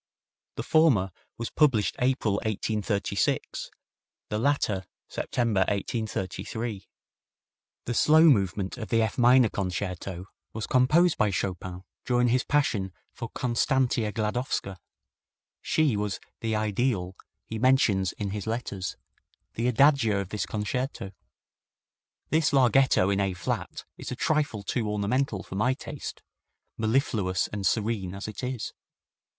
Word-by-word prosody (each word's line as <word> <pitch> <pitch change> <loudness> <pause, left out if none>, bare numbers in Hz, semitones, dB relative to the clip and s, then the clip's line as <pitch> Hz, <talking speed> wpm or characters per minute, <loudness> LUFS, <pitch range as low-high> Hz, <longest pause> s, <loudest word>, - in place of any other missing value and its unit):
The - - -4
former 130 - +3 0.3
was 115 - -4
published 130 -10 +3
April, 125 -5 +1
1836; 105 -1 -1 0.6
the 105 - -1
latter 110 -8 +1 0.2
September, 115 -5 -1
1833. 105 0 -3 1.0
The 120 - -2
slow 155 +6 +5
movement 100 - +3
of 110 - -6
the 115 -1 +3
F 110 +2 -2
minor 125 0 +6
Concerto 90 -1 -4 0.3
was 110 -1 -3
composed 150 +7 +3
by 105 - +3
Chopin 90 -1 -3 0.2
during 125 -1 +2
his 125 +1 +2
passion 110 -10 +1 0.2
for 115 -2 -6
Constantia 120 -2 +1
Gladowska. 105 -3 -2 0.8
She 155 -7 +2
was 105 -1 -2 0.2
"the 110 -1 -1
ideal" 105 -3 0 0.3
he 110 - -5
mentions 110 -7 +3
in 100 -2 -4
his 105 0 -5
letters, 105 -5 -3 0.6
the 115 +2 -1
adagio 125 -4 +4
of 95 -2 -4
this 105 - -3
concerto. 110 0 -3 1.2
This 155 -2 +3
larghetto 130 -6 +4
in 100 - +1
A 95 -2 0
flat 90 - -4
is - - -6
a - - -2
trifle 145 -7 0
too 110 +1 -1
ornamental 105 +1 0
for - - -10
my 120 +7 +1
taste, 145 0 -7 0.5
mellifluous 110 -5 +1
and 100 -3 -1
serene 105 -3 -1
as 100 - -6
it 110 +4 -7
is. 125 -2 -3
110 Hz, 125 wpm, -27 LUFS, 100-125 Hz, 1.2 s, minor